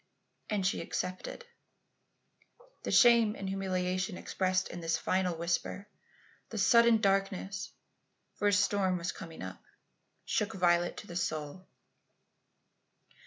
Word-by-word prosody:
"And 205 -3 0
she 190 - +1
accepted." 185 - -4 1.4
The - - -4
shame 235 -3 +6
and 195 - -5
humiliation 185 0 -1
expressed 185 0 0
in 175 - -7
this 165 0 0
final 185 -2 0
whisper; 175 +4 -2 0.6
the 225 - -6
sudden 235 +2 +5
darkness 195 0 0 0.6
for 205 - 0
a 205 - +3
storm 200 -2 +2
was 170 0 -3
coming 165 -3 -9
up - - -8 0.6
shook 210 0 -1
Violet 175 -1 +2
to - - -8
the 175 - -9
soul. 155 0 -3
190 Hz, 120 wpm, -31 LUFS, 180-205 Hz, 1.4 s, shame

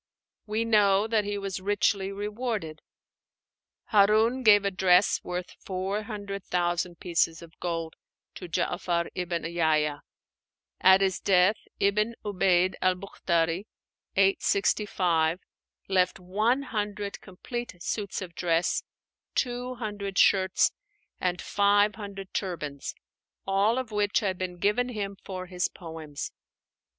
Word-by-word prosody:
We 215 +2 0
know 205 -2 +4
that 220 -2 +1
he 205 0 -2
was 195 -2 -4
richly 200 0 +1
rewarded. 205 -5 -4 1.1
Harún 215 +5 +4
gave 205 -3 +6
a 200 - +1
dress 185 0 +3
worth 180 0 -4
four 190 +2 -3
hundred 205 -3 -6
thousand 175 0 -1
pieces 165 -1 0
of 165 -1 -16
gold 165 -2 -3 0.4
to 180 - -9
Já'far 175 0 -1
ibn 175 -2 -2
Yahya; 155 -3 +1 0.8
at 190 +1 +6
his 190 -2 +1
death, 190 +2 +4 0.2
Ibn 210 +3 +2
'Ubeid 185 -2 +2
al 185 0 +3
Buchtarí 175 -1 -1 0.5
(865) 190 -3 +2 0.5
left 185 -1 +2
one 215 +9 +1
hundred 205 -4 -4
complete 240 +4 -6
suits 200 -3 -3
of 175 -2 -9
dress, 170 0 +1 0.5
two 250 0 -1
hundred 205 -4 -5
shirts, 190 -1 +4 0.5
and 180 -1 -1
five 205 +1 +3
hundred 200 -2 -8
turbans 150 -7 -4 0.5
all 200 +5 +2
of 255 -3 -3
which 210 0 +1
had 190 -3 -1
been 180 -1 -4
given 210 +7 +1
him 200 -4 -4
for 185 -1 -6
his 180 0 -1
poems. 160 -4 -7
195 Hz, 120 wpm, -27 LUFS, 180-210 Hz, 1.1 s, gave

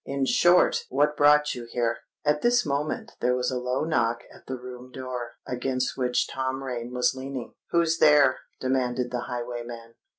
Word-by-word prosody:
In 140 -1 -1
short, 175 +6 +4
what 145 +3 +2
brought 150 0 +5
you 120 -1 -7
here?" 120 -1 0 0.3
At 150 0 +2
this 240 0 +3
moment 150 - -2
there 125 0 +2
was 125 0 0
a 125 - -1
low 125 +2 -1
knock 120 -7 +1
at - - -18
the 130 - -4
room 125 0 -10
door, 125 -2 -6
against 130 +1 -2
which 125 -2 +1
Tom 130 0 -3
Rain 125 -2 -4
was 125 +1 +2
leaning. 130 -2 -6 0.2
"Who's 165 -1 +2
there?" 145 -3 +5 0.2
demanded 125 -1 0
the 125 -1 -3
highwayman. 120 -1 -6
130 Hz, 170 wpm, -26 LUFS, 125-145 Hz, 0.3 s, brought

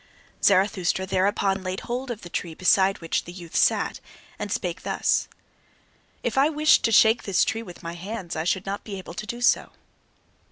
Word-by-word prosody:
Zarathustra 190 -1 +2
thereupon 195 +1 +1
laid 185 0 -4
hold 250 +2 -4
of 235 -3 -5
the 175 - -8
tree 170 -2 -4
beside 190 +2 +3
which 165 - -1
the 175 - -8
youth 175 -2 -11
sat, - - +2 0.4
and - - -4
spake - - -2
thus: - - 0 1.0
"If - - 0
I 285 +3 +5
wished 305 0 +4
to 225 - +2
shake 220 +1 +5
this 195 -3 +2
tree 225 - -2
with 180 -5 -11
my 170 0 -5
hands, 180 0 -6
I 160 - -2
should 185 +2 0
not 195 +1 -4
be 200 -3 -6
able 185 -2 -9
to 215 +4 -6
do 240 0 -5
so. 240 - +2
195 Hz, 190 wpm, -25 LUFS, 180-225 Hz, 1.0 s, I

